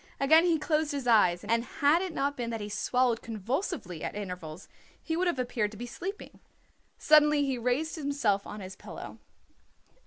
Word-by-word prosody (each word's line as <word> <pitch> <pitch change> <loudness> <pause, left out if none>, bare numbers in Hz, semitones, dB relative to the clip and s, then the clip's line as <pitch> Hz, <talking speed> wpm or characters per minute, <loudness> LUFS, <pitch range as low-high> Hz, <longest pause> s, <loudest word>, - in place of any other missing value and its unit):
Again 315 +5 +5
he 335 -2 +3
closed 305 -1 0
his 280 -3 -3
eyes, 205 -7 +4
and 230 +2 +1
had 290 +7 +2
it 375 -1 -3
not 285 -1 -1
been 240 -2 -3
that 225 -1 -3
he 205 0 -5
swallowed 245 +2 +1
convulsively 225 - -4
at - - -4
intervals 180 -4 -7 0.3
he 320 - -3
would 365 +2 +1
have 345 - 0
appeared 245 -4 -1
to - - -10
be 240 - -5
sleeping. 370 - -7 0.6
Suddenly 300 -1 +5
he 265 -3 -2
raised 255 +8 -1
himself 280 -9 0
on 210 - -7
his 190 0 -8
pillow. - - -10
250 Hz, 180 wpm, -29 LUFS, 210-305 Hz, 0.6 s, Again